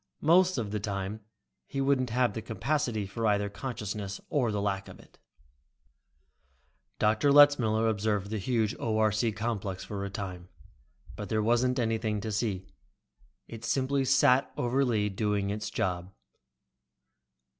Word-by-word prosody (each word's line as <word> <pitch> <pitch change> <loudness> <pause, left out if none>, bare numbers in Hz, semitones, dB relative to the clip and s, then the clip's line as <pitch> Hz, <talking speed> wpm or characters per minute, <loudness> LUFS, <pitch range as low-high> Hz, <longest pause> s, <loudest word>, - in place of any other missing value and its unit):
Most 180 +3 +4
of 110 -4 -3
the 105 - -1
time 100 0 -4 0.5
he 135 - -4
wouldn't 135 -2 +2
have 120 -1 +1
the 110 - -4
capacity 115 -2 -1
for 110 +4 -2
either 100 -1 +1
consciousness 105 -2 -5
or 125 -7 +1
the 105 - -1
lack 100 -1 -2
of - - -12
it. - - -20 1.8
Dr. 110 +7 +3
Letzmiller 130 -7 +5
observed 105 -2 -1
the 110 - -2
huge 110 +1 0
ORC 110 0 +1
complex 105 -4 -3
for 100 -2 -5
a 100 - -3
time, 90 -3 -6 0.7
but 105 -2 -6
there 110 -1 +1
wasn't 120 +3 +2
anything 110 -3 0
to 110 - -4
see. 100 -3 -2 0.8
It 115 -1 -9
simply 135 +4 +1
sat 135 0 +4
over 125 +3 +1
Lee, 110 -5 +1
doing 100 0 -1
its 105 +1 -4
job. 90 0 -2
110 Hz, 140 wpm, -29 LUFS, 100-125 Hz, 1.8 s, Letzmiller